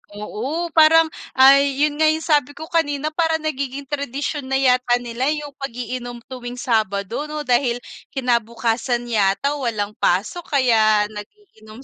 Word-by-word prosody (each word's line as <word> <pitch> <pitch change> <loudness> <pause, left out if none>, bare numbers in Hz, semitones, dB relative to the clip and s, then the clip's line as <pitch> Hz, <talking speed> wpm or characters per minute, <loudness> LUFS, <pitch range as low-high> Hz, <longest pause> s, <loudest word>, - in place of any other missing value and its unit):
Oo, 270 +11 -4
parang 320 0 +5 0.2
ay, 275 +1 +5
yon 300 0 0
nga 315 - +4
yung 315 +1 +1
sabi 290 -3 +1
ko 315 - -8
kanina, 305 -2 0
parang 320 0 0
nagiging 280 -2 -3
tradisyon 280 0 -4
na 270 - -1
yata 250 -2 +3
nila 240 +2 -2
yung 295 -1 -7
pag-iinom 245 -2 -6
tuwing 245 -1 -7
Sabado 220 +1 -1
'no, 300 0 -5
dahil 245 -2 +1 0.4
kinabukasan 235 -1 0
yata 205 +5 +1
walang 215 -5 -2
pasok 210 - 0
kaya 220 -6 +3
nag-iinom 220 - -12
260 Hz, 135 wpm, -21 LUFS, 235-295 Hz, 0.4 s, parang